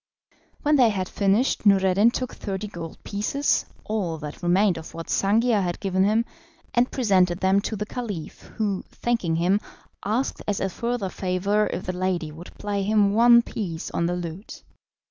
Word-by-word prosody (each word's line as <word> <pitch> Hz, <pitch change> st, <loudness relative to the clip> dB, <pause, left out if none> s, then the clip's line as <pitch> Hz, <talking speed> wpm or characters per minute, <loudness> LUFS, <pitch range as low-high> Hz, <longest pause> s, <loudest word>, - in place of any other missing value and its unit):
When 295 Hz, 0 st, +4 dB
they 245 Hz, -4 st, +6 dB
had 190 Hz, -3 st, -2 dB
finished 200 Hz, +7 st, +1 dB
Noureddin 195 Hz, +1 st, +5 dB
took 255 Hz, +1 st, -4 dB
thirty 195 Hz, 0 st, -4 dB
gold 170 Hz, -5 st, -8 dB
pieces 210 Hz, +8 st, 0 dB, 0.2 s
(all 195 Hz, -7 st, -2 dB
that 150 Hz, -1 st, -8 dB
remained 180 Hz, +1 st, +3 dB
of 160 Hz, 0 st, -11 dB
what 165 Hz, 0 st, -7 dB
Sangiar 215 Hz, +2 st, +2 dB
had 175 Hz, -2 st, -2 dB
given 190 Hz, -1 st, +1 dB
him) 220 Hz, +3 st, +2 dB, 0.5 s
and 245 Hz, +1 st, +3 dB
presented 185 Hz, -8 st, +2 dB
them 190 Hz, +1 st, +3 dB
to 220 Hz, -, -3 dB
the 210 Hz, 0 st, -3 dB
Caliph, 210 Hz, -8 st, -6 dB, 0.2 s
who, 205 Hz, -3 st, -1 dB
thanking 230 Hz, -9 st, -1 dB
him, 180 Hz, +5 st, +2 dB, 0.4 s
asked 225 Hz, +6 st, -1 dB
as 205 Hz, -2 st, 0 dB
a 195 Hz, -, -1 dB
further 235 Hz, 0 st, -2 dB
favour 195 Hz, +3 st, 0 dB
if 180 Hz, -, -4 dB
the 185 Hz, -, -2 dB
lady 180 Hz, -3 st, -1 dB
would 165 Hz, +4 st, -12 dB
play 205 Hz, -1 st, -2 dB
him 205 Hz, 0 st, +3 dB
one 235 Hz, +1 st, +6 dB
piece 175 Hz, -9 st, -5 dB
on 170 Hz, -, 0 dB
the 175 Hz, -, -1 dB
lute. 175 Hz, +3 st, -7 dB
200 Hz, 170 wpm, -24 LUFS, 180-220 Hz, 0.5 s, they